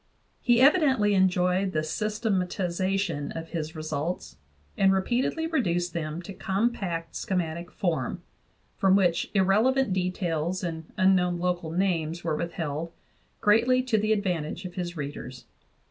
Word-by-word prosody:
He 240 Hz, -1 st, +4 dB
evidently 270 Hz, -, +4 dB
enjoyed 185 Hz, 0 st, +2 dB
the 155 Hz, 0 st, 0 dB
systematization 190 Hz, -4 st, -1 dB
of 165 Hz, 0 st, -6 dB
his 160 Hz, -2 st, -4 dB
results, 155 Hz, +2 st, -4 dB, 0.4 s
and 195 Hz, 0 st, +4 dB
repeat 215 Hz, +7 st, +1 dB
edly 325 Hz, 0 st, -2 dB
reduced 175 Hz, -, 0 dB
them 165 Hz, 0 st, -4 dB
to 195 Hz, -, -8 dB
compact 190 Hz, -5 st, -2 dB
schematic 170 Hz, -2 st, -2 dB
form, 175 Hz, 0 st, -2 dB, 0.5 s
from 190 Hz, -1 st, +4 dB
which 180 Hz, -4 st, +2 dB
irrelevant 215 Hz, +5 st, +3 dB
details 180 Hz, -2 st, -1 dB
and 165 Hz, -2 st, -5 dB
unknown 185 Hz, -2 st, +3 dB
local 175 Hz, -2 st, -1 dB
names 170 Hz, -2 st, -1 dB
were 160 Hz, -2 st, 0 dB
withheld, 165 Hz, -1 st, -3 dB, 0.5 s
greatly 240 Hz, +5 st, +4 dB
to 235 Hz, -4 st, +1 dB
the 215 Hz, +1 st, 0 dB
advantage 180 Hz, -4 st, -1 dB
of 180 Hz, -, -6 dB
his 175 Hz, -1 st, -4 dB
readers. 140 Hz, -3 st, -6 dB
180 Hz, 130 wpm, -27 LUFS, 165-200 Hz, 0.5 s, He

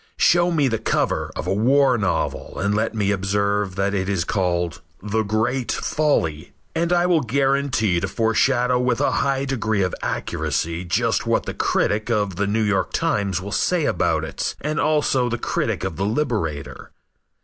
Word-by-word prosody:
Show 175 Hz, +1 st, +4 dB
me 155 Hz, -5 st, +2 dB
the 115 Hz, -3 st, -1 dB
cover 110 Hz, -, 0 dB
of -, -, -4 dB
a -, -, 0 dB
war 130 Hz, +5 st, +3 dB
novel, 100 Hz, -6 st, -2 dB
and 100 Hz, +3 st, 0 dB
let 110 Hz, +2 st, 0 dB
me 100 Hz, -2 st, +1 dB
observe 100 Hz, 0 st, 0 dB
that 100 Hz, +1 st, 0 dB
it 95 Hz, -1 st, -1 dB
is 95 Hz, -4 st, 0 dB
called 90 Hz, -3 st, -1 dB, 0.2 s
"The 105 Hz, +1 st, 0 dB
Great 110 Hz, +4 st, -1 dB
Folly," 85 Hz, -, -1 dB, 0.2 s
and 170 Hz, +1 st, 0 dB
I 175 Hz, 0 st, +3 dB
will 175 Hz, -3 st, +3 dB
guarantee 135 Hz, -6 st, +1 dB
to 95 Hz, -, -2 dB
foreshadow 120 Hz, +4 st, +2 dB
with 125 Hz, -1 st, +1 dB
a -, -, +2 dB
high 135 Hz, -1 st, 0 dB
degree 110 Hz, -6 st, 0 dB
of 90 Hz, -, -1 dB
accuracy 85 Hz, +2 st, -2 dB
just 110 Hz, +4 st, 0 dB
what 115 Hz, -, +1 dB
the -, -, -4 dB
critic 105 Hz, +3 st, 0 dB
of 105 Hz, -5 st, 0 dB
The 100 Hz, +1 st, 0 dB
New 110 Hz, +2 st, +1 dB
York 100 Hz, -3 st, 0 dB
Times 100 Hz, -3 st, 0 dB
will 100 Hz, +2 st, -7 dB
say 175 Hz, -, +1 dB
about -, -, +1 dB
it -, -, -3 dB
and 150 Hz, +1 st, -2 dB
also 145 Hz, -5 st, +2 dB
the 120 Hz, -, -2 dB
critic -, -, -2 dB
of 95 Hz, -4 st, -3 dB
The 95 Hz, -, -1 dB
Liberator. 105 Hz, -, -2 dB
110 Hz, 175 wpm, -22 LUFS, 100-135 Hz, 0.2 s, Show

